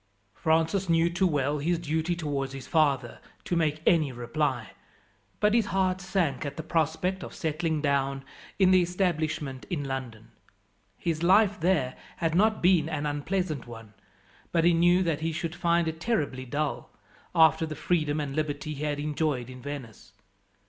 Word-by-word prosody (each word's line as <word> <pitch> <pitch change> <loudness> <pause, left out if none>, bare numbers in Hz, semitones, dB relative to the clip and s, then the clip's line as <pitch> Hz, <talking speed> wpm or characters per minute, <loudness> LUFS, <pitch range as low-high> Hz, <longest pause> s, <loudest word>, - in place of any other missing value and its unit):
Francis 165 - +1
knew 165 +1 +3
too 185 +2 +2
well 145 -2 0
his 170 +4 +1
duty 160 +1 -1
towards 140 -5 -3
his 135 -1 -7
father 140 -7 +1 0.2
to 175 - -2
make 155 -2 0
any 155 -5 +3
reply, 120 0 -2 0.7
but 210 0 +3
his 230 -2 +3
heart 185 -1 0
sank 180 -8 -1
at 140 -1 -5
the 160 - -4
prospect 165 +4 0
of - - -9
settling 160 -2 -1
down 135 -1 0 0.3
in 190 -2 +5
the 185 -1 +6
establishment 160 -7 -1
in 160 -6 -2
London. 130 -5 -6 0.7
His 165 -2 -2
life 200 +3 +4
there 155 -7 +1 0.2
had 165 -1 0
not 215 +4 +2
been 175 -4 +4
an 150 -2 -2
unpleasant 150 -1 -2
one, 115 -2 -11 0.6
but 165 -1 +2
he 175 +1 +5
knew 175 +2 +4
that 160 -3 -1
he 165 +1 -1
should 165 +1 -3
find 170 -1 +1
it 160 0 -4
terribly 145 - -1
dull, 145 +4 -3 0.5
after 160 0 +5
the 155 - -5
freedom 155 -4 0
and 140 -2 -3
liberty 155 0 -2
he 145 +1 -6
had 145 -1 -1
enjoyed 145 -4 -1
in 125 0 -11
Venice. 125 -7 -8
155 Hz, 165 wpm, -27 LUFS, 140-175 Hz, 0.7 s, the